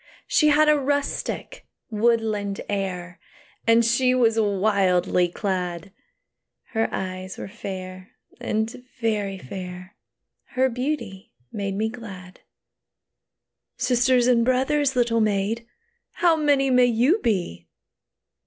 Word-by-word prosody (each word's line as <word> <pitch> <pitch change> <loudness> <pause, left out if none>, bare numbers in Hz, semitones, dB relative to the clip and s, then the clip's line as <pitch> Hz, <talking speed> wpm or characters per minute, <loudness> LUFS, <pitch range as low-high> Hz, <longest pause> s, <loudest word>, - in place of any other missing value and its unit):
She 420 -11 +3
had 300 +1 +5
a 300 -1 +5
rustic, 285 - -2 0.3
woodland 215 -2 0
air, 185 -3 -4 0.5
And 230 0 +5
she 250 +2 +3
was 225 -3 +3
wildly 190 -4 +2
clad; 180 -1 -3 0.8
Her 225 -1 0
eyes 185 0 -5
were - - -6
fair, 185 -2 -8 0.3
and 220 +3 -2 0.2
very 210 -4 -1
fair; 180 +4 -8 0.6
Her 260 +1 +3
beauty 250 -6 -4 0.2
made 200 -2 -3
me 215 +2 0
glad. 195 -6 -9 1.4
"Sisters 250 0 +3
and 240 -2 +4
brothers, 265 +3 +1
little 235 -2 +2
maid, 215 +2 0 0.5
How 340 -2 +3
many 285 -3 +2
may 250 0 +5
you 245 - +3
be?" 175 - -2
220 Hz, 105 wpm, -24 LUFS, 190-250 Hz, 1.4 s, had